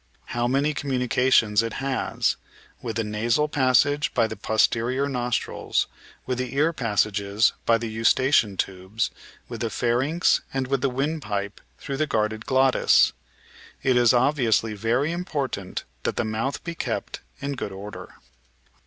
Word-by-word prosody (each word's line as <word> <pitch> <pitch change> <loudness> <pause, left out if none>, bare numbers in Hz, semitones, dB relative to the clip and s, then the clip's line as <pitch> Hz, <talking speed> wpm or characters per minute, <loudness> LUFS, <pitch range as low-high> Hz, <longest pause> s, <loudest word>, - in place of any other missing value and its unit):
How 120 0 0
many 140 +4 +1
communi 130 -3 -2
cations 115 -4 +3
it 115 -1 -3
has 135 -1 -1 0.2
— - - -28
^with 115 -3 -4
the 115 - 0
nasal 115 +7 +1
passage 145 +1 +2
by 115 - +4
the 110 - -5
posterior 115 +5 +1
nostrils, 125 -3 -1 0.4
with 125 -1 -2
the 130 +1 -3
ear 155 +4 +2
passages 105 -3 +1
by 115 - +5
the 115 0 -4
Eustachian 115 -1 +2
tubes, 95 +4 -2 0.4
with - - -7
the 115 - 0
pharynx, 125 - +1
and 135 -1 -1
with 135 0 -1
the 135 - +2
windpipe 125 -7 -3 0.2
through 135 - -5
the 155 +1 0
guarded 110 -3 -1
glottis. 130 0 +4 0.7
It 130 -1 +3
is 120 -2 +5
obvi 130 +1 +2
ously 110 0 +2
very 120 +8 0
important 145 - -3 0.2
that - - -2
the 120 - -1
mouth 110 +5 -2
be 170 - -4
kept - - -4 0.2
in 140 0 -3
good 120 - -5
order. 100 +2 -9
120 Hz, 155 wpm, -24 LUFS, 110-135 Hz, 0.7 s, by